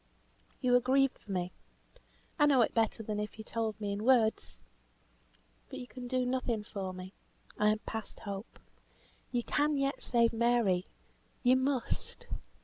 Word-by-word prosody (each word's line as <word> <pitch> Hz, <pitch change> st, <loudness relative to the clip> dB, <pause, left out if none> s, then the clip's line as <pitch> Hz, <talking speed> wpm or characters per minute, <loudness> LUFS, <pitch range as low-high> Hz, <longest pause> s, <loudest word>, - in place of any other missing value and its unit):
"You 250 Hz, -2 st, +3 dB
are 245 Hz, -, +7 dB
grieved 265 Hz, +2 st, +2 dB
for 200 Hz, -, -10 dB
me! 180 Hz, -1 st, -1 dB, 0.9 s
I 295 Hz, -, +6 dB
know 270 Hz, -4 st, +5 dB
it -, -, -1 dB
better 225 Hz, 0 st, +1 dB
than 210 Hz, -1 st, -3 dB
if 210 Hz, +1 st, -4 dB
you 220 Hz, -, -7 dB
told 220 Hz, -2 st, -2 dB
me 205 Hz, -1 st, -2 dB
in 205 Hz, +1 st, -3 dB
words. 230 Hz, -, +3 dB, 1.1 s
But -, -, -7 dB
you 250 Hz, -, -6 dB
can 250 Hz, 0 st, -8 dB
do 255 Hz, 0 st, 0 dB
nothing 245 Hz, -4 st, -1 dB
for 195 Hz, -3 st, -5 dB
me. 185 Hz, +1 st, -8 dB, 0.5 s
I 210 Hz, -, +4 dB
am 215 Hz, -, +3 dB
past 220 Hz, -1 st, -5 dB
hope. 200 Hz, +2 st, -6 dB, 0.7 s
You 240 Hz, -2 st, 0 dB
can 295 Hz, +3 st, +1 dB
yet 275 Hz, 0 st, 0 dB
save 235 Hz, -1 st, +3 dB
Mary. 225 Hz, -6 st, +2 dB, 0.6 s
You 250 Hz, 0 st, +6 dB
must. 260 Hz, -1 st, -1 dB
230 Hz, 160 wpm, -32 LUFS, 210-255 Hz, 1.1 s, are